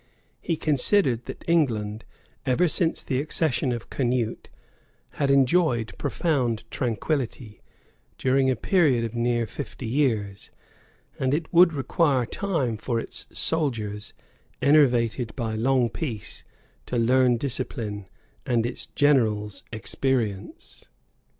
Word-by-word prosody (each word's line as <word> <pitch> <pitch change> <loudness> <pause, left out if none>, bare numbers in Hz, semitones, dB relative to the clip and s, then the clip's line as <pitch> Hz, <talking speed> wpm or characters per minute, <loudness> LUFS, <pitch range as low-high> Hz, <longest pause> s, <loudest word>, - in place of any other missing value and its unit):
He 165 - -1
considered 140 - +1
that - - -8
England, 115 -10 +1 0.4
ever 135 +8 +2
since 165 +1 0
the 130 0 -1
accession 150 -3 0
of 120 -1 -5
Canute, 120 -3 -1 0.7
had 140 -2 +2
enjoyed 135 - +3
profound 135 -7 0
tranquillity, 120 -2 -3 0.6
during 130 0 +2
a 130 - +2
period 145 - +2
of 115 -1 -4
near 120 0 0
fifty 130 +1 -7
years; 110 -6 -1 0.7
and 130 +1 +1
it 160 +2 -4
would 170 0 +7
require 140 -2 +1
time 140 - -1
for 115 +1 -2
its - - -6
soldiers, 110 -10 -1 0.5
enervated 125 -5 +3
by 115 -3 -2
long 125 +2 +2
peace, 115 -4 -5 0.4
to 125 - -2
learn 125 +1 +4
discipline, 115 -6 -4 0.4
and 120 -2 +1
its 120 - -4
generals 110 -8 +1
experience. 110 -3 -3
125 Hz, 110 wpm, -25 LUFS, 115-145 Hz, 0.7 s, would